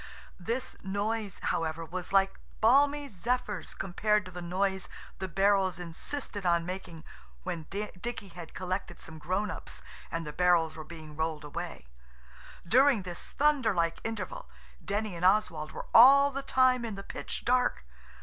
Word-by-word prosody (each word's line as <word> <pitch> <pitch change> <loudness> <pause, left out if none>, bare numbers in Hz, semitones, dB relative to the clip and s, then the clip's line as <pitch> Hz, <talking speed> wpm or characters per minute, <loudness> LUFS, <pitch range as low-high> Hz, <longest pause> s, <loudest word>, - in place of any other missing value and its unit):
This 230 +8 -2
noise, 205 +1 -1
however, 165 0 -2
was 180 +2 -5
like 195 0 +3 0.2
balmy 285 +5 +4
zephyrs 240 +1 -2
compared 210 +2 +1
to 185 - -9
the 180 0 -7
noise 190 +2 -1 0.3
the 190 - -3
barrels 195 -1 +2
insisted 195 - -4
on 170 -2 +2
making 180 -3 -6 0.4
when 160 - -4
Dicky 205 +1 -5
had 175 -2 -10
collected 185 -1 -3
some 160 -1 -9
grown 190 +5 -1
ups 160 - -6 0.3
and 165 0 -3
the 150 - -6
barrels 170 -2 +3
were 155 - -7
being 155 -1 -10
rolled 160 -1 -2
away. 165 - -6 0.8
During 255 0 +5
this 175 -1 -6
thunder 285 -8 +2
like 170 -1 +1
interval - - -5 0.3
Denny 205 -1 -2
and 170 - -6
Oswald 180 -6 +2
were - - -7
all 280 +4 +9
the 275 0 -3
time 255 -2 +3
in 225 -3 -4
the 195 - -7
pitch - - -6
dark. 250 - +2
190 Hz, 150 wpm, -30 LUFS, 170-225 Hz, 0.8 s, all